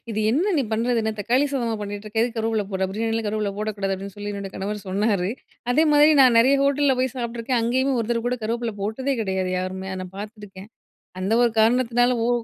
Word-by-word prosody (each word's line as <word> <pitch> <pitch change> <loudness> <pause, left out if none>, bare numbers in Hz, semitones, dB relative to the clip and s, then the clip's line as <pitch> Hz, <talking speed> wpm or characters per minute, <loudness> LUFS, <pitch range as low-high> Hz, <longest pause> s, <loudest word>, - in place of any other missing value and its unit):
இது 215 -1 -2
என்ன 345 - +1
நீ 280 - +2
பண்ணுறது 230 +2 +1
என்ன 220 0 -1
தக்காளி 250 +7 +2
சாதமா 235 -4 -1
பண்ணிட்டு 205 +1 -6
இருக்க! 220 +1 -1
எதுக்கு 235 -1 -2
கருவேப்பில 220 -1 0
போட்ற! 190 -1 -1
பிரியாணிலாம் 225 +1 -1
கருவேப்பில 210 -1 -1
போடக்கூடாது 205 -2 -2
அப்பிடின்னு 195 +1 -8
சொல்லி 205 0 -5
என்னோட 200 -1 -6
கணவர் 205 +1 -4
சொன்னாரு 200 -1 0 0.4
அதேமாரி 300 +1 +5
நான் 250 -3 +5
நிறைய 265 +4 +5
ஹோட்டல்ல 280 -1 +2
போய் 260 -1 -1
சாப்பிட்டுருக்கேன், 235 0 -2
அங்கேயுமே 260 +4 +1
ஒருத்தர் 230 0 -1
கூட 250 - -2
கருவேப்பில 230 0 -2
போட்டதே 260 +7 -1
கிடையாது 190 -3 -1
யாருமே! 190 +1 -4
நான் 185 0 -10
பார்த்துருக்கேன். 205 -1 -10 0.5
அந்த 190 +3 -1
1 240 - +4
காரணத்தினால 245 +1 +3 0.2
ஓ - - 0
225 Hz, 190 wpm, -23 LUFS, 205-245 Hz, 0.5 s, அதேமாரி